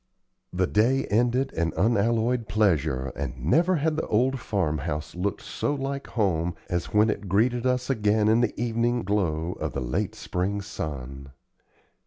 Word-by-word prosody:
The 90 +1 +1
day 115 +8 +2
ended 125 +5 +2
in 85 0 -1
unalloyed 115 +2 +2
pleasure, 80 - +1
and - - -4
never 170 - +3
had 155 0 0
the - - -2
old 130 +5 +2
farm 85 -10 -1
house 75 +1 -4
looked 95 +3 -3
so 145 - -2
like 140 0 -4
home 90 -6 0 0.2
as 85 -1 0
when 105 +1 +4
it 100 -2 -6
greeted 120 +6 +2
us 125 0 0
again 105 -4 +2
in 110 +2 +4
the 120 -3 -1
evening 120 0 0
glow 90 -5 0
of - - -3
the - - -2
late 60 -1 -2
spring 95 +3 -2
sun. 70 -7 -6
105 Hz, 160 wpm, -26 LUFS, 85-120 Hz, 0.2 s, when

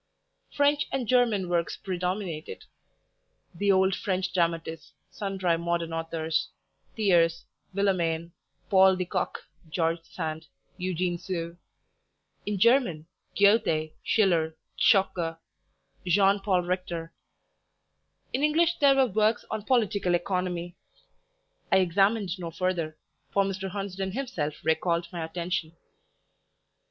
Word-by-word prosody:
French 290 0 +2
and 255 -4 -2
German 230 -7 +3
works 170 -1 -1
predominated, 180 -3 -4 0.9
the 200 +4 +2
old 190 0 +3
French 190 -2 -2
dramatists, 165 -2 -1 0.2
sundry 190 -4 -1
modern 170 -1 -1
authors, 165 -1 -2 0.5
Thiers, 170 -6 +2 0.3
Villemain, 170 -4 0 0.4
Paul 190 -2 +6
de 185 0 -2
Kock, - - -3 0.3
George 165 0 0
Sand, 160 -2 -5 0.3
Eugene 180 -1 -1
Sue; 170 -2 -4 0.9
in 205 -1 -1
German 195 - +3 0.3
Goethe, 200 -7 +3
Schiller, 170 -7 +2 0.2
Zschokke, 180 -6 +3 0.7
Jean 195 +3 +4
Paul 190 -3 +1
Richter; 175 -2 -3 1.2
in 265 - 0
English 325 +3 +2
there 280 -2 +6
were 270 -1 +5
works 215 0 +1
on 220 - -2
Political 205 -8 +2
Economy. 175 -1 -2 1.0
I - - +6
examined 195 +1 +2
no 170 -2 -4
further, 165 -2 -2 0.3
for 200 - +2
Mr. 195 0 -3
Hunsden 195 -1 -4
himself 170 - -3
recalled 170 +1 +1
my 170 -2 -3
attention. 170 0 -3
185 Hz, 105 wpm, -27 LUFS, 170-200 Hz, 1.2 s, Paul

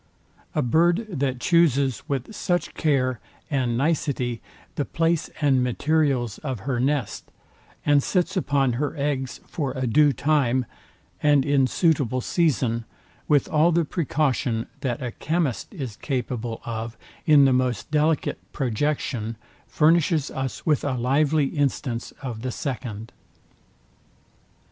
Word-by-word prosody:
A 150 - +2
bird, 170 - +3
that 135 -5 -1
chooses 140 - +3
with 140 - -3
such 175 -4 -1
care 130 -6 +1 0.3
and 125 -4 0
nicety 135 -5 0 0.3
the 145 - -1
place 165 +2 0
and 135 -4 +3
materials 130 -3 0
of 130 -8 -4
her 130 0 -2
nest, 135 -2 -1 0.6
and 145 -1 +5
sits 180 +5 0
upon 140 -8 +1
her 150 +2 -2
eggs 135 -3 -2
for 140 -5 -3
a 130 -1 -2
due 145 +5 +4
time, 130 -2 +1 0.6
and 145 -2 +4
in 140 -2 +3
suitable 140 -6 +1
season, 125 -6 +1 0.4
with 145 -2 +3
all 155 +2 +4
the 170 -1 +2
precaution 135 -7 0
that 125 -2 -2
a 120 - -3
chymist 155 -1 -1
is 135 - -6
capable 120 -4 -3
of 115 0 -5 0.3
in 145 -3 +7
the 135 - +4
most 125 -2 0
delicate 155 +1 +1
projection, 120 -3 -1 0.3
furnishes 160 -1 +2
us 130 -1 -4
with 150 -4 +2
a 140 - 0
lively 140 +4 +2
instance 135 -4 -2
of 120 -4 -5
the 130 - -3
second. 120 -5 -5
135 Hz, 130 wpm, -24 LUFS, 125-150 Hz, 0.6 s, in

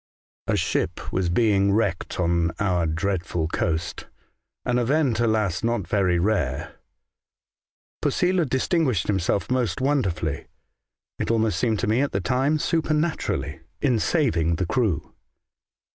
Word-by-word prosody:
*' - - -
A - - +2
ship - - -2
was 90 -2 0
being 100 0 +3
wrecked 100 -6 -1
on 85 -1 +2
our 90 -4 +1
dreadful 85 0 -1
coast 80 0 -2 0.3
— - - -58
an 125 0 +1
event, 130 -1 +1
alas, 110 -6 +1
not 115 -6 0
very 95 -3 +2
rare. 85 -8 -1 1.3
Posela 180 -5 +1
dis 130 +1 0
tinguished 135 - +1
himself 100 +2 0
most 125 0 0
wonderfully 100 - -1 0.4
— - - -66
it - - -2
almost 110 -1 +1
seemed 115 -3 +1
to 120 - 0
me 110 +5 +2
at 145 - -1
the 100 - +1
time 130 - +1
supernaturally 155 +1 -1
— - - -45
in 125 -5 +3
saving 95 - +1
the 90 +2 -1
crew. 110 -3 -1
105 Hz, 145 wpm, -24 LUFS, 90-130 Hz, 1.3 s, being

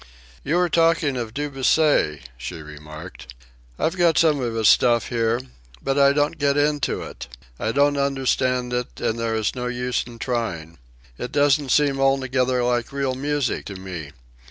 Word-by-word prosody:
"You 150 - 0
were 180 0 +3
talking 165 -4 +2
of 115 -3 -4
Debussy," 140 - +1
she 75 +8 -7
remarked. 75 -2 -11 0.4
"I've 165 - 0
got 170 -3 +3
some 155 -3 +4
of 120 -3 -2
his 110 -2 +2
stuff 120 -3 +4
here. 115 0 +1 0.4
But 135 - -1
I 140 0 +6
don't 145 +2 0
get 140 0 +2
into 145 -1 0
it. - - -9 0.3
I 110 - -1
don't 145 +3 +2
understand 130 -2 0
it, 125 0 -3
and 115 +1 -1
there 115 -1 -1
is 110 -1 0
no 125 -1 -4
use 125 0 -1
in 120 -1 -11
trying. 90 - -3 0.4
It 125 - -5
doesn't 145 -1 +2
seem 140 0 +3
altogether 130 -2 +1
like 120 -1 0
real 140 -2 -1
music 140 0 -1
to 100 - -7
me. 90 -6 -7
125 Hz, 165 wpm, -23 LUFS, 115-145 Hz, 0.4 s, I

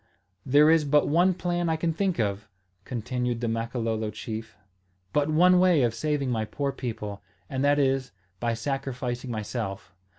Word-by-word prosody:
"There 145 +4 +6
is 165 -1 +4
but 145 0 +3
one 175 +4 +3
plan 175 -1 -1
I 160 - +2
can 165 +1 -1
think 185 +1 0
of," 105 -1 -1 0.4
continued 125 0 -2
the 120 - -2
Makololo 115 -1 -2
chief, 110 0 -7 0.6
"but 145 +1 +2
one 180 +4 +5
way 180 -6 +4
of 120 -2 +1
saving 140 +2 -1
my 110 -2 0
poor 140 +6 -2
people, 110 -6 -5 0.3
and 135 -1 -2
that 145 0 +4
is, 135 -2 +1 0.3
by 115 -1 0
sacrificing 125 -1 -3
myself. 105 -4 -4
130 Hz, 160 wpm, -27 LUFS, 115-150 Hz, 0.6 s, There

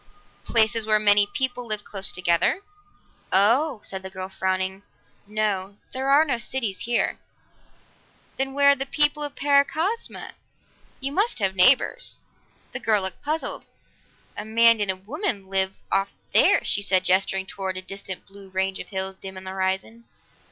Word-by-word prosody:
"Places 225 -1 +3
where 215 -1 +4
many 205 -1 +4
people 245 +1 -2
live 215 -1 -1
close 195 -1 -1
together." 175 - +1 0.7
"Oh," 230 +6 +3
said 190 -1 -4
the 190 - -7
girl 190 0 -6
frowning. 190 0 -2 0.5
"No. 205 -2 -2 0.2
There 265 +1 -2
are 290 +3 +6
no 260 -6 -1
cities 225 -4 -3
here." 240 0 0 1.2
"Then 270 0 -2
where 280 0 +6
are - - +3
the 270 0 -4
people 295 +1 +2
of 290 -1 -5
Paracosma? 300 +9 0 0.7
You 275 +1 -3
must 405 +10 0
have 195 -3 0
neighbors." 260 - +4 0.5
The - - -5
girl 215 -3 +3
looked 190 - -5
puzzled. 310 +2 -3 0.7
"A 205 - -5
man 230 +1 +4
and 205 - 0
a 190 - +1
woman 205 - -3
live 190 0 0
off 195 +1 0 0.2
there," - - +5
she 205 - +1
said, 190 -2 +2
gesturing 190 +1 +2
toward 190 -1 -5
a - - -3
distant 195 -1 -6
blue 195 -1 -14
range 190 0 -1
of - - -7
hills 190 -1 -4
dim 190 -1 -8
on 185 - -9
the 190 - -7
horizon. 190 +5 -3
205 Hz, 160 wpm, -24 LUFS, 190-265 Hz, 1.2 s, are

